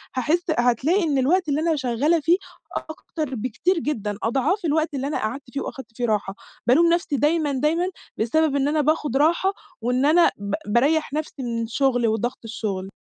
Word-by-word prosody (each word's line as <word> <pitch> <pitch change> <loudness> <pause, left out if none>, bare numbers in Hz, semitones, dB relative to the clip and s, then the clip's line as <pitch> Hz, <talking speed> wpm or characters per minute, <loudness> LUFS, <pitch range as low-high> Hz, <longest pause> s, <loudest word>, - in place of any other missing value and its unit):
هاحس 305 +7 +1 0.2
هتلاقي 260 - +2
إن 290 -4 +1
الوقت 315 +5 +2
اللي 285 +2 +1
أنا 325 0 +2
شغّالة 275 +5 +1
فيه، 330 +4 +3 0.5
أكتر، 310 -3 -5
بكتير، 255 - 0
جدًا 210 -10 -3
أضعاف 280 - 0
الوقت 315 0 +1
اللي 275 0 -2
أنا 295 - -1
قعدت 245 +6 -3
فيه، 275 - -2
وأخدت 260 -4 -8
فيه 245 - 0
راحة. 205 -3 -1 0.3
بالوم 320 +8 +5
نفسي 345 -4 0
دايمًا، 300 +2 +2
دايمًا 305 +6 +1 0.3
بسبب 290 +6 +1
إن 280 0 +2
أنا 305 0 +2
باخد 295 -3 +1
راحة، 340 +6 +3 0.3
وإن 250 +3 +1
أنا 335 +3 +5
ب 200 0 -5
باريّح 280 +7 +2
نفسي 300 -3 -4
من 235 -1 -2
الشغل، 245 0 +1
وضغط 225 +3 -1
الشغل. 200 -4 -4
280 Hz, 175 wpm, -23 LUFS, 240-315 Hz, 0.5 s, بالوم